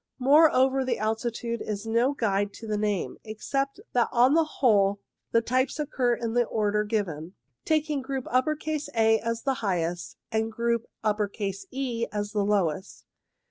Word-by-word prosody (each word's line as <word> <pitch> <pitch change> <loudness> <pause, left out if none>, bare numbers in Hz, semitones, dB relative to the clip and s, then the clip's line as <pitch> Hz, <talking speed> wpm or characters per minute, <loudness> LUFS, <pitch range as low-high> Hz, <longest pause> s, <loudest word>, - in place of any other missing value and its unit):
Moreover, 270 -1 +5
the 255 -2 -1
altitude 230 +2 -2
is 210 0 -4
no 235 +5 +2
guide 205 -4 0
to 230 - -10
the 215 -1 -2
name, 210 -2 -1
except 275 +6 -3
that 240 -1 +3
on 250 +3 +4
the 325 +1 +5
whole 205 -9 +2 0.3
the 230 - +4
types 255 +3 0
occur 260 -5 +1
in 230 -1 -3
the 245 0 +3
order 210 -1 0
given, 185 -6 -3 0.3
taking 305 -2 +1
group 265 -1 -4
A 260 -5 +1
as 230 0 -3
the 270 - +1
highest 175 -4 -2
and 220 0 0
group 235 0 -1 0.8
E 250 -3 -2
as 205 0 -3
the 210 -1 0
lowest. 195 -3 -1
230 Hz, 145 wpm, -27 LUFS, 210-260 Hz, 0.8 s, Moreover